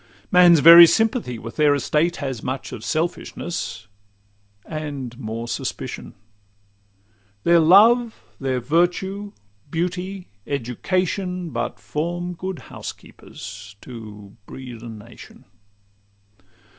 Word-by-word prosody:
Man's 175 Hz, -4 st, +7 dB
very 170 Hz, +2 st, +11 dB
sympathy 225 Hz, -, 0 dB
with 115 Hz, +1 st, -9 dB
their 150 Hz, -2 st, +4 dB
estate 155 Hz, +5 st, +1 dB
Has 130 Hz, -5 st, -4 dB
much 130 Hz, +1 st, -4 dB
of 110 Hz, -, -8 dB
selfishness, 160 Hz, -7 st, -3 dB, 0.8 s
and 145 Hz, -6 st, -6 dB
more 115 Hz, -1 st, -5 dB
suspicion. -, -, -5 dB, 1.3 s
Their 170 Hz, 0 st, +5 dB
love, 220 Hz, +8 st, +5 dB, 0.2 s
their 130 Hz, -2 st, -1 dB
virtue, 180 Hz, -, 0 dB, 0.4 s
beauty, 180 Hz, +3 st, -3 dB, 0.2 s
education, 180 Hz, -, -2 dB
But -, -, -3 dB
form 175 Hz, +3 st, -3 dB
good 185 Hz, +1 st, -5 dB, 0.2 s
housekeepers, 100 Hz, +1 st, -10 dB
to 105 Hz, -5 st, -11 dB
breed 125 Hz, -4 st, -9 dB
a 120 Hz, -, -8 dB
nation. 115 Hz, +1 st, -13 dB
155 Hz, 95 wpm, -22 LUFS, 120-180 Hz, 1.3 s, very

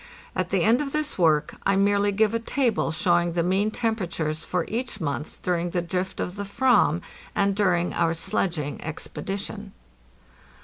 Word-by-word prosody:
At -, -, -1 dB
the -, -, +2 dB
end 235 Hz, +5 st, +4 dB
of 275 Hz, -2 st, -4 dB
this 305 Hz, -7 st, -1 dB
work 155 Hz, -4 st, +3 dB
I 195 Hz, -, +3 dB
merely 200 Hz, +1 st, +3 dB
give 215 Hz, +2 st, +2 dB
a 230 Hz, -, +1 dB
table 235 Hz, -, 0 dB
showing 175 Hz, 0 st, +2 dB
the 170 Hz, -1 st, +1 dB
mean 190 Hz, +4 st, +2 dB
temperatures 175 Hz, -9 st, -2 dB
for 180 Hz, -2 st, -1 dB
each 235 Hz, -1 st, -3 dB
month 150 Hz, -2 st, -4 dB
during 175 Hz, -1 st, 0 dB
the 175 Hz, 0 st, 0 dB
drift 185 Hz, +2 st, -3 dB
of 180 Hz, +3 st, -3 dB
the 200 Hz, -, -2 dB
/vam 200 Hz, -, +3 dB, 0.3 s
and 200 Hz, -1 st, +2 dB
during 180 Hz, -4 st, +2 dB
our 165 Hz, -1 st, +1 dB
sledging 160 Hz, -3 st, -2 dB
expedi 160 Hz, +5 st, -5 dB
tion. 205 Hz, 0 st, -7 dB
195 Hz, 170 wpm, -25 LUFS, 170-210 Hz, 0.3 s, end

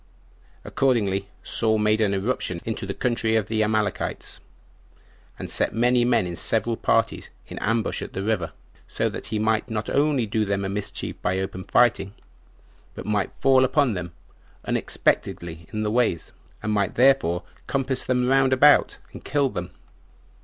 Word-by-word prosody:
Accordingly, 100 Hz, -7 st, +1 dB, 0.2 s
Saul 110 Hz, -1 st, +1 dB
made 105 Hz, +1 st, +2 dB
an 100 Hz, -2 st, +2 dB
irruption 95 Hz, -4 st, -2 dB
into 110 Hz, -3 st, -3 dB
the 100 Hz, -, -3 dB
country 115 Hz, -3 st, 0 dB
of 110 Hz, -3 st, +2 dB
the 110 Hz, +1 st, -1 dB
Amalekites, 110 Hz, -1 st, -2 dB, 1.0 s
and -, -, -6 dB
set -, -, -1 dB
many 120 Hz, +1 st, +3 dB
men 120 Hz, -5 st, +2 dB
in 85 Hz, -1 st, -4 dB
several -, -, 0 dB
parties -, -, 0 dB, 0.2 s
in -, -, -8 dB
ambush 115 Hz, 0 st, 0 dB
at -, -, -7 dB
the 95 Hz, -, -3 dB
river, 100 Hz, -6 st, -1 dB, 0.5 s
that -, -, -1 dB
so -, -, -5 dB
he 110 Hz, -, -1 dB
might 110 Hz, 0 st, 0 dB
not 110 Hz, -1 st, -3 dB
only 140 Hz, -4 st, +2 dB
do 110 Hz, +1 st, 0 dB
them 100 Hz, -1 st, -1 dB
a -, -, -2 dB
mischief 100 Hz, +1 st, -4 dB
by 90 Hz, +1 st, 0 dB
open 95 Hz, -1 st, -4 dB
fighting, 105 Hz, -5 st, +2 dB, 0.8 s
but -, -, -7 dB
might 105 Hz, -2 st, 0 dB
fall 130 Hz, -1 st, +4 dB
upon 130 Hz, -1 st, +2 dB
them 90 Hz, -2 st, -5 dB, 0.5 s
unexpectedly 85 Hz, -1 st, -1 dB
in 110 Hz, 0 st, -2 dB
the 105 Hz, -, -1 dB
ways, 110 Hz, -9 st, 0 dB, 0.3 s
and 105 Hz, -, -1 dB
might 100 Hz, -2 st, 0 dB
thereby 125 Hz, -9 st, +3 dB, 0.3 s
compass 135 Hz, -1 st, 0 dB
them 125 Hz, -1 st, +1 dB
round 135 Hz, 0 st, +3 dB
about, 145 Hz, +3 st, +5 dB, 0.2 s
and -, -, -10 dB
kill 145 Hz, -2 st, +1 dB
them. 90 Hz, -6 st, -5 dB
110 Hz, 160 wpm, -24 LUFS, 100-125 Hz, 1.0 s, about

